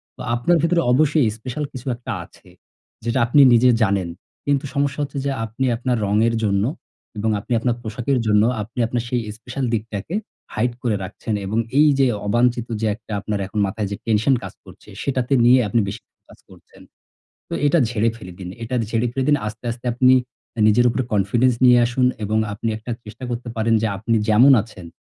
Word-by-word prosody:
তো 130 Hz, -, -11 dB
আপনার 170 Hz, +8 st, +2 dB
ভেতরে 170 Hz, +1 st, +2 dB
অবশ্যই 150 Hz, 0 st, +3 dB
স্পেশাল 125 Hz, +6 st, -5 dB
কিছু 130 Hz, -1 st, -9 dB
একটা 120 Hz, -, -7 dB
আছে, -, -, -21 dB, 0.5 s
যেটা 120 Hz, +3 st, 0 dB
আপনি 130 Hz, +5 st, +5 dB
নিজে 125 Hz, +2 st, +5 dB
জানেন। 95 Hz, -4 st, 0 dB, 0.4 s
কিন্তু 140 Hz, 0 st, +1 dB
সমস্যা 140 Hz, 0 st, 0 dB
হচ্ছে 140 Hz, 0 st, -6 dB
যে 140 Hz, -, 0 dB
আপনি 115 Hz, +5 st, -3 dB
আপনার 120 Hz, +1 st, -1 dB
রঙের 110 Hz, +3 st, +2 dB
জন্য 100 Hz, -1 st, +1 dB, 0.5 s
এবং 110 Hz, +2 st, 0 dB
আপনি 120 Hz, -, -4 dB
আপনার 120 Hz, 0 st, 0 dB
পোশাকের 120 Hz, +4 st, -2 dB
জন্য 105 Hz, 0 st, +4 dB, 0.2 s
আপনি 115 Hz, +5 st, -8 dB
আপনার 120 Hz, 0 st, -2 dB
সেই 125 Hz, -2 st, 0 dB, 0.2 s
স্পেশাল 130 Hz, +3 st, -4 dB
দিকটাকে 110 Hz, -, -4 dB, 0.4 s
hide 120 Hz, +2 st, 0 dB
করে 115 Hz, -4 st, 0 dB
রাখছেন 100 Hz, +3 st, -5 dB
এবং 110 Hz, +4 st, -2 dB, 0.2 s
এইযে 140 Hz, -3 st, +4 dB, 0.2 s
অবাঞ্চিত 120 Hz, +2 st, +1 dB
যে -, -, 0 dB
একটা 110 Hz, 0 st, -15 dB
আপনার 105 Hz, 0 st, -3 dB
এখন 110 Hz, -, -4 dB
মাথায় 100 Hz, +1 st, -3 dB
যে 100 Hz, -, -2 dB
টেনশন 115 Hz, +4 st, +2 dB
কাজ -, -, -7 dB
করছে, -, -, -16 dB
সেটাতে 130 Hz, -1 st, -1 dB
নিয়ে 125 Hz, +1 st, +6 dB
আপনি 110 Hz, +4 st, +1 dB
বেশি 105 Hz, +3 st, -6 dB
ফোকাস -, -, -20 dB
করছেন। -, -, -18 dB, 0.7 s
তো -, -, -12 dB
এটা 145 Hz, +4 st, +3 dB
ঝেড়ে 115 Hz, 0 st, +1 dB
ফেলে 90 Hz, -5 st, -10 dB
দিন 90 Hz, -2 st, -7 dB
এটা 120 Hz, +3 st, -4 dB, 0.2 s
ঝেড়ে 115 Hz, +1 st, +1 dB
ফেলে 130 Hz, 0 st, -1 dB
দিন। 145 Hz, -, +5 dB
আস্তে, 110 Hz, +3 st, -7 dB
আস্তে 120 Hz, +1 st, -11 dB
আপনি 130 Hz, +1 st, +5 dB, 0.5 s
আ -, -, 0 dB
নিজের 120 Hz, +3 st, +4 dB
উপর 125 Hz, -, -2 dB
confidence 115 Hz, +5 st, +2 dB
নিয়ে 125 Hz, -1 st, +7 dB
আসুন 125 Hz, +1 st, +1 dB, 0.2 s
এবং 110 Hz, +2 st, 0 dB
আপনি 105 Hz, +3 st, -3 dB
একটা 110 Hz, +3 st, -8 dB
চেষ্টা 110 Hz, +4 st, -9 dB
করতে 120 Hz, 0 st, -4 dB
পারেন 115 Hz, +1 st, +1 dB
যে -, -, +2 dB
আপনি 115 Hz, +3 st, 0 dB
যেমন 120 Hz, +6 st, +6 dB
আছেন, 95 Hz, -6 st, -12 dB
120 Hz, 190 wpm, -21 LUFS, 110-130 Hz, 0.7 s, নিয়ে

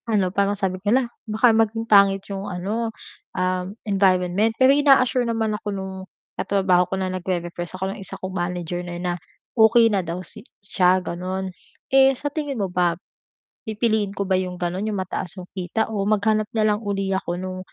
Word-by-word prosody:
Ano, 195 Hz, -4 st, +1 dB
parang 200 Hz, +1 st, +1 dB
sabi 185 Hz, -2 st, -2 dB
ko, 205 Hz, -, -1 dB
"Hala, 255 Hz, +3 st, +3 dB, 0.2 s
baka 225 Hz, +2 st, +4 dB
maging 225 Hz, 0 st, +1 dB
pangit 200 Hz, -3 st, +5 dB
'yong 195 Hz, 0 st, -5 dB
ano, 205 Hz, +6 st, -2 dB, 0.5 s
um, 185 Hz, 0 st, 0 dB, 0.2 s
environment," 195 Hz, +1 st, +2 dB
pero 260 Hz, +1 st, +6 dB
ina-assure 265 Hz, -4 st, +4 dB
naman 225 Hz, -2 st, 0 dB
ako 210 Hz, 0 st, -4 dB
nung 190 Hz, -1 st, -4 dB, 0.4 s
katrabaho 190 Hz, -2 st, +2 dB
ko 190 Hz, -, -1 dB
na 185 Hz, -1 st, -2 dB
nag-re-repress 175 Hz, -1 st, -4 dB
ako 190 Hz, +1 st, -2 dB
ng -, -, -10 dB
isa 190 Hz, -, -7 dB
kong 190 Hz, 0 st, -6 dB
manager 175 Hz, -1 st, -3 dB
na 175 Hz, -1 st, -6 dB
na, 175 Hz, 0 st, -2 dB, 0.4 s
okey 225 Hz, 0 st, +5 dB
na 195 Hz, -, +2 dB
daw 170 Hz, 0 st, -4 dB
si -, -, -10 dB, 0.2 s
siya 185 Hz, -2 st, +3 dB
gano'n. 185 Hz, +2 st, -4 dB, 0.4 s
Eh 270 Hz, -1 st, +6 dB
sa 290 Hz, +2 st, -4 dB
tingin 290 Hz, -4 st, -3 dB
mo 200 Hz, -, 0 dB
ba 175 Hz, -2 st, +1 dB, 0.7 s
pipiliin 220 Hz, -2 st, 0 dB
ko 200 Hz, 0 st, -3 dB
ba 190 Hz, -, +2 dB
'yong 180 Hz, -1 st, -2 dB
gano'n 180 Hz, +2 st, -2 dB
'yong 205 Hz, -, -2 dB
mataas 185 Hz, 0 st, -4 dB
yung 180 Hz, -, -9 dB
kita 190 Hz, +4 st, -1 dB
o 210 Hz, -3 st, -2 dB
maghanap 215 Hz, +1 st, +1 dB
na 215 Hz, -1 st, +2 dB
lang 215 Hz, -, -8 dB
uli 195 Hz, -1 st, -1 dB
ako 175 Hz, -2 st, -3 dB
nung 185 Hz, 0 st, -5 dB
195 Hz, 185 wpm, -23 LUFS, 185-220 Hz, 0.7 s, pero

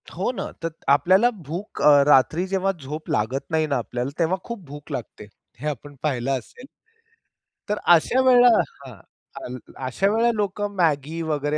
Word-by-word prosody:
हो 190 Hz, +8 st, -1 dB
ना. 255 Hz, -, -5 dB, 0.2 s
तर 165 Hz, -, 0 dB, 0.2 s
आपल्याला 185 Hz, +11 st, +5 dB, 0.2 s
भूक 175 Hz, +7 st, -6 dB
अ, 145 Hz, -1 st, +7 dB
रात्री 150 Hz, +6 st, +4 dB
जेव्हा 195 Hz, 0 st, +1 dB
झोप 150 Hz, +3 st, -7 dB
लागत 125 Hz, +6 st, -1 dB
नाही 160 Hz, -1 st, +1 dB
ना 140 Hz, -, 0 dB
आपल्याला, 120 Hz, +2 st, -3 dB
तेव्हा 170 Hz, +3 st, +1 dB
खूप 235 Hz, -5 st, -7 dB
भूक 145 Hz, +2 st, -11 dB
लागते. 120 Hz, -5 st, -7 dB, 0.3 s
हे 150 Hz, -, -4 dB
आपण 145 Hz, 0 st, -6 dB
पाहिलं 135 Hz, -2 st, 0 dB
असेल. 255 Hz, -, -15 dB, 1.0 s
तर 210 Hz, 0 st, -1 dB, 0.2 s
अशा 240 Hz, +11 st, +2 dB
वेळेला 250 Hz, -1 st, +6 dB, 0.4 s
हां, 130 Hz, -3 st, -10 dB, 0.4 s
हां, 125 Hz, +1 st, -6 dB, 0.3 s
अशा 160 Hz, +10 st, 0 dB
वेळेला 230 Hz, +3 st, +2 dB
लोकं 205 Hz, 0 st, -2 dB
मॅगी 160 Hz, -2 st, 0 dB
वगैरे 150 Hz, -2 st, -1 dB
155 Hz, 160 wpm, -23 LUFS, 140-195 Hz, 1.0 s, अ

